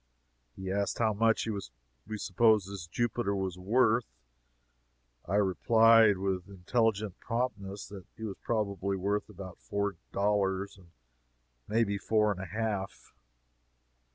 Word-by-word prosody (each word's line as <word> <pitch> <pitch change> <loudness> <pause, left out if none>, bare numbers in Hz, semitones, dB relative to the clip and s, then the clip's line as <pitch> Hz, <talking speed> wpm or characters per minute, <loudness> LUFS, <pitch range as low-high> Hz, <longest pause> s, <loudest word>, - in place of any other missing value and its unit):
He 95 0 -5
asked 100 +1 -1
how 110 -2 +2
much 115 +2 +2 0.6
we 110 0 -4
supposed 105 0 +3
this 95 -4 -7
Jupiter 120 +1 -1
was 95 -2 -3
worth? 115 +3 +2 1.1
I 95 - 0
replied, 110 +2 +5
with 95 -1 -2
intelligent 105 +1 0
promptness, 105 -5 -3
that 100 -3 -10
he 110 - -8
was 105 -3 -5
probably 100 -3 -1
worth 100 +2 -1
about 95 -2 -10
four 100 -2 -2
dollars 100 -1 0 0.9
may 115 +2 +2
be 100 -2 -2
four 105 0 +2
and 95 -2 -4
a 95 - -6
half. 105 0 -4
100 Hz, 125 wpm, -30 LUFS, 95-110 Hz, 1.1 s, replied